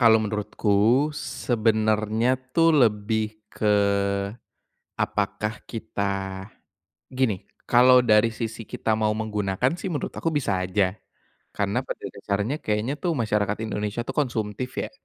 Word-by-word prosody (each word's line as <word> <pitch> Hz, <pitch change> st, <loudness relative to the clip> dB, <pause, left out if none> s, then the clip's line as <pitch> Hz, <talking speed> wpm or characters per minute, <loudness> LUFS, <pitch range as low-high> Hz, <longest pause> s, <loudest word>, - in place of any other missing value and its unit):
Kalau 115 Hz, -2 st, +7 dB
menurutku, 105 Hz, +5 st, +1 dB
sebenarnya 110 Hz, -1 st, +1 dB, 0.2 s
tuh 165 Hz, -1 st, +5 dB
lebih 110 Hz, -3 st, +1 dB
ke 105 Hz, -1 st, +2 dB, 1.1 s
apakah 105 Hz, +1 st, -2 dB
kita 100 Hz, -3 st, -3 dB, 0.7 s
gini, 125 Hz, -8 st, 0 dB, 0.2 s
kalau 125 Hz, +1 st, +7 dB
dari 115 Hz, -1 st, +4 dB
sisi 115 Hz, 0 st, -5 dB
kita 110 Hz, +1 st, -1 dB
mau 110 Hz, -1 st, +1 dB
menggunakan 105 Hz, -, -1 dB
sih 185 Hz, 0 st, -4 dB
menurut 150 Hz, -, -3 dB
aku 165 Hz, -, -1 dB
bisa 100 Hz, -11 st, 0 dB
aja. 95 Hz, +1 st, +1 dB, 0.6 s
Karena -, -, 0 dB
pada -, -, -6 dB
dasarnya 105 Hz, +9 st, -2 dB
kayaknya 110 Hz, +6 st, -1 dB
tuh 170 Hz, 0 st, -1 dB
masyarakat 105 Hz, -5 st, 0 dB
Indonesia 105 Hz, +1 st, -2 dB
tuh -, -, -6 dB
konsumtif 120 Hz, -1 st, -2 dB
ya, -, -, -5 dB
110 Hz, 120 wpm, -25 LUFS, 105-120 Hz, 1.1 s, Kalau